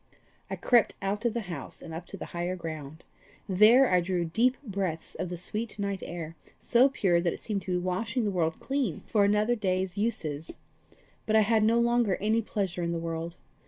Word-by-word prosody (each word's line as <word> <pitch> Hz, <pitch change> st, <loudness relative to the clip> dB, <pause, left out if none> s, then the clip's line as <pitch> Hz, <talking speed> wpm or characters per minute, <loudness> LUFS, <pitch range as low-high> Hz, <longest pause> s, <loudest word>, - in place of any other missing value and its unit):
I -, -, -2 dB
crept 240 Hz, -3 st, +3 dB
out 205 Hz, +4 st, -2 dB
of 235 Hz, -1 st, +1 dB
the 235 Hz, -, 0 dB
house, 170 Hz, -9 st, -6 dB
and 165 Hz, -, -9 dB
up 170 Hz, +2 st, -7 dB
to 195 Hz, -, -8 dB
the -, -, -6 dB
higher 175 Hz, +1 st, -2 dB
ground. 155 Hz, -3 st, -7 dB, 0.4 s
There 215 Hz, +8 st, +6 dB
I 180 Hz, -4 st, +3 dB
drew 175 Hz, -1 st, -1 dB
deep 235 Hz, +10 st, +2 dB
breaths 190 Hz, -, -3 dB
of 180 Hz, -, -4 dB
the 175 Hz, -, -5 dB
sweet 215 Hz, +6 st, -4 dB
night 200 Hz, -2 st, -2 dB
air 165 Hz, -2 st, -6 dB, 0.2 s
so 250 Hz, +3 st, +4 dB
pure 185 Hz, -10 st, +2 dB
that 170 Hz, -1 st, 0 dB
it -, -, -8 dB
seemed 205 Hz, -3 st, -3 dB
to 185 Hz, -, -3 dB
be -, -, +2 dB
washing 210 Hz, +6 st, -1 dB
the 205 Hz, -, 0 dB
world 165 Hz, -3 st, 0 dB
clean 265 Hz, -, -2 dB
for 210 Hz, -2 st, +2 dB
another 210 Hz, +3 st, +3 dB
day's 190 Hz, -3 st, -1 dB
uses. 160 Hz, -9 st, -2 dB, 0.7 s
But 220 Hz, -, +2 dB
I 220 Hz, -, +7 dB
had 215 Hz, +1 st, +3 dB
no 230 Hz, +2 st, +4 dB
longer 235 Hz, -4 st, +2 dB
any 220 Hz, +3 st, +1 dB
pleasure 195 Hz, -5 st, -3 dB
in 170 Hz, 0 st, -1 dB
the -, -, -1 dB
world. 165 Hz, 0 st, -4 dB
195 Hz, 205 wpm, -28 LUFS, 170-220 Hz, 0.7 s, I